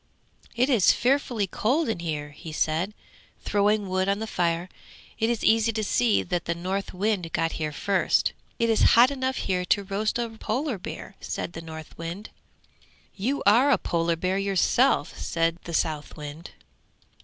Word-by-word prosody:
'It 245 +2 +3
is 240 -9 +5
fearfully 245 -4 +1
cold 255 - 0
in 225 -6 -1
here,' 150 -3 -4
he 155 +2 -9
said, 160 +6 -1 0.5
throwing 205 0 +2
wood 185 +1 0
on 200 - +2
the 220 - -4
fire; 175 -4 -1 0.5
'it 225 0 +2
is 235 -2 -1
easy 225 0 +4
to 215 -1 -2
see 225 +1 +2
that 175 -1 -2
the 170 - -1
Northwind 185 0 -2
got 165 0 +1
here 155 -1 -3
first!' 195 +6 +1 0.2
'It 230 - +1
is 225 -1 +2 0.2
hot 245 +3 +7
enough 260 -1 -1
here 180 -1 -1
to 200 +2 +2
roast 205 +3 -1
a 240 -1 -1
polar 225 +2 -3
bear,' 190 - -8
said 175 - -4
the 165 - -6
Northwind. 165 +4 -8 0.8
'You 255 +9 -1
are 235 +8 +6
a 280 - +5
polar 170 0 0
bear 185 +3 -1
yourself!' 195 - +2
said 165 0 0
the 170 - -6
Southwind. 150 +1 -3
195 Hz, 160 wpm, -26 LUFS, 170-225 Hz, 0.8 s, hot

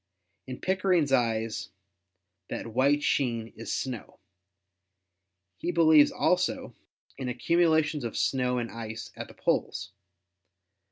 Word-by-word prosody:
In 130 -1 -6
Pickering's 185 -6 +1
eyes 115 -3 0 0.8
that 115 - -6
white 140 +4 +3
sheen 115 -5 0
is 115 - -6
snow. 125 -4 -4 1.4
He 175 - -3
believes 160 -3 +6
also 180 0 0 0.5
in 130 -2 -3
ac 125 - -4 0.2
cumulations 160 -4 +3
of 115 - -4
snow 125 -2 +1
and 115 -3 -3
ice 110 0 -7
at - - -6
the - - -15
poles. 90 0 -1
130 Hz, 115 wpm, -28 LUFS, 115-155 Hz, 1.4 s, believes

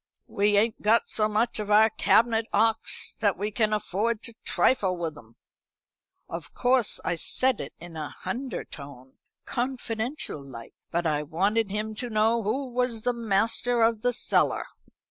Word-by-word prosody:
We 205 0 +1
ain't 220 +2 +1
got 220 +3 +2
so 215 -1 +1
much 220 +2 0
of 210 -1 -4
our 215 +1 +5
cabinet 225 +1 +2
'ocks 225 +2 +2
that 205 -4 +1
we 205 +3 -2
can 215 0 +1
afford 215 +2 -1
to 230 - -5
trifle 190 -8 +1
with 165 -3 -3
'em.' 115 -3 -16 0.9
Of 165 -2 -8
course 250 -3 +3
I 180 - +1
said 255 +8 +2
it - - -8
in 175 -1 -11
a 155 -2 -4
hundertone, 145 - -7 0.3
confidential 240 - -3
like; 120 -4 -11 0.2
but 170 +1 -1
I 150 -2 +1
wanted 195 +8 0
him 210 +2 -3
to 245 - -4
know 220 +1 +2
who 240 +7 -1
was 245 -2 -1
master 230 +2 +1
of 225 -1 +2
the 245 - +2
cellar." 245 - +1
215 Hz, 155 wpm, -26 LUFS, 185-235 Hz, 0.9 s, our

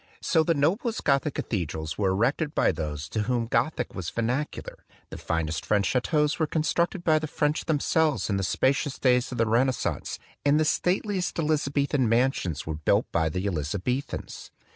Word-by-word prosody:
So 160 - +3
the 165 +1 +1
noblest 195 - 0
Gothic 140 +1 +1
cathe 95 -8 -2
drals 80 +1 -5
were 100 -2 +1
erected 135 - 0
by - - +3
those 75 -2 -4
to 110 - -1
whom 120 +1 0
Gothic 125 +1 -1
was 90 -4 -4
vernacular; 125 +6 -3 0.3
the - - -6
finest 80 -1 -2
French 100 -2 +1
chateaux 150 - +2
were 160 - +2
constructed 170 +3 0
by 155 -2 +4
the 155 - -4
French 150 0 -1
themselves 155 0 +1
in 100 - 0
the 95 - -1
spacious 135 +7 +1
days 125 -1 +2
of 125 - -5
the 115 - +3
Renascence; 125 +4 0 0.3
and 145 +1 +4
the 155 - +2
state 180 +6 +1
liest 195 -4 -2
Elizabethan 140 -4 +1
mansions 115 - +1
were 80 - -3
built 75 - +2
by 80 -1 +1
the 90 +5 -3
Elizabethans. 100 - -3
130 Hz, 175 wpm, -26 LUFS, 100-155 Hz, 0.3 s, by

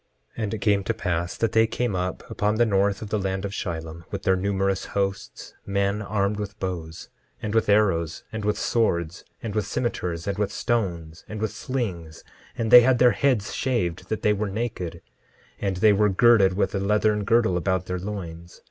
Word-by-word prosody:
10:8 115 - -3
And 105 - -2
it 105 - -8
came 100 -1 +2
to - - -1
pass 85 0 -2
that 115 -2 0
they 110 0 +4
came 120 -2 -2
up 90 0 -3
upon 105 +1 0
the 120 +2 +3
north 100 -1 +1
of 105 - -7
the 105 - 0
land 95 0 -2
of 100 - -4
Shilom, 80 -3 -5
with - - -5
their 95 - +3
numerous 95 0 0
hosts, 100 -1 -3
men 100 +1 0
armed 105 0 -1
with 100 0 -6
bows, 85 -4 -5 0.3
and 105 -2 -4
with 115 -2 +2
arrows, 95 -6 +2
and 110 -1 -5
with 105 0 0
swords, 85 -8 0 0.2
and 110 -3 -4
with 105 -2 -1
cimeters, 90 -9 -2
and 100 0 -3
with 105 -1 0
stones, 85 -11 -2
and 105 - -5
with 110 -1 -1
slings; 100 -10 -4 0.3
and 115 -1 -1
they 125 - +11
had 125 +1 +3
their 125 0 +6
heads 125 -8 +1
shaved 95 -9 -1
that 110 - -3
they 105 - +4
were 105 0 -2
naked; 95 -6 -4 0.6
and 95 -2 -1
they 105 +2 +5
were 105 +1 +3
girded 100 -1 +5
with 100 - 0
a 100 - 0
leathern 105 +1 +1
girdle 110 -3 +3
about 95 0 0
their 90 0 -3
loins. 90 -3 -7
100 Hz, 200 wpm, -25 LUFS, 90-110 Hz, 0.6 s, they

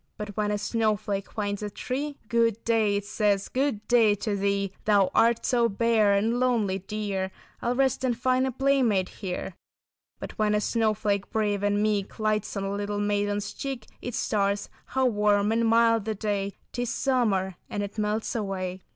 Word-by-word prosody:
"But 210 0 -5
when 210 -1 0
a 210 - 0
snowflake 210 -3 -1
finds 205 -2 -3
a 210 - -3
tree 280 +7 -4
Good 230 -1 +1
day, 220 -3 +2
it 200 0 -2
says, 205 -1 0
good 260 -5 -1
day 225 -4 +5
to 205 0 -2
thee. 200 -1 0
Thou 205 -3 +4
art 230 0 +3
so 235 -2 +3
bare 215 -1 +3
and 225 +4 +1
lonely, 225 -7 +1
dear, 195 -1 -3 0.3
I'll 240 +1 0
rest 265 0 +1
and 245 -3 +1
find 255 +1 +2
a - - -1
playmate 255 -8 +2
here. 190 -1 -5 0.6
"But - - -9
when 210 -1 +2
a - - +3
snowflake 210 -3 0
brave 210 -2 0
and 205 0 +1
meek 205 -2 -1
Lights 215 -1 -1
on 195 - -2
a 195 0 -2
little 205 0 -2
maiden's 205 0 -1
cheek, 265 -5 -5 0.2
It 245 -1 -4
starts—how 205 +6 -1
warm 210 -2 +2
and 230 0 +2
mild 230 -1 +4
the 220 -1 -2
day, 200 -1 -2 0.2
'Tis 245 -1 -2
summer; 205 -10 +1
and 205 - -2
it 205 +2 -6
melts 215 +3 -1
away." 190 -4 -3
210 Hz, 175 wpm, -27 LUFS, 200-230 Hz, 0.6 s, day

